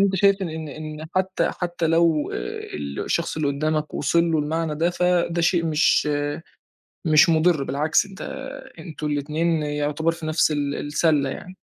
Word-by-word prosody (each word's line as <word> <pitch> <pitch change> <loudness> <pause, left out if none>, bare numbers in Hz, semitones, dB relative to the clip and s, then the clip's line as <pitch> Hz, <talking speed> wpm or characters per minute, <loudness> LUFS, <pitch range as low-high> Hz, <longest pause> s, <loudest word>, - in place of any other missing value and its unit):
أنت 195 -1 +3
شايف 200 0 +3
إن 160 -3 -4
إن 155 +1 -7
حتّى 190 0 +1
حتّى 175 -2 -2
لو 165 -2 +2
آآ - - -4
الشخص 70 - -2
اللي 155 -2 0
قُدّامك 155 +2 -1
وصل 170 +3 +2
له 160 - +2
المعنى 155 +1 -1
ده، 165 +3 +1
فده 175 -1 +1
شيء 170 0 +2
مش 155 -1 +3 1.0
مش 155 +2 +6
مُضِر، 160 -2 +3
بالعكس 150 +8 +1
أنت 195 0 -13 0.6
أنتم 155 -3 -6
الاتنين 155 +2 0
يُعتبر 150 +2 -1
في 165 -2 -7
نفس 155 0 +2
ال 145 -1 -1
السلّة 145 -1 +1
يعني. 185 +6 -9
160 Hz, 155 wpm, -23 LUFS, 150-170 Hz, 1.0 s, مش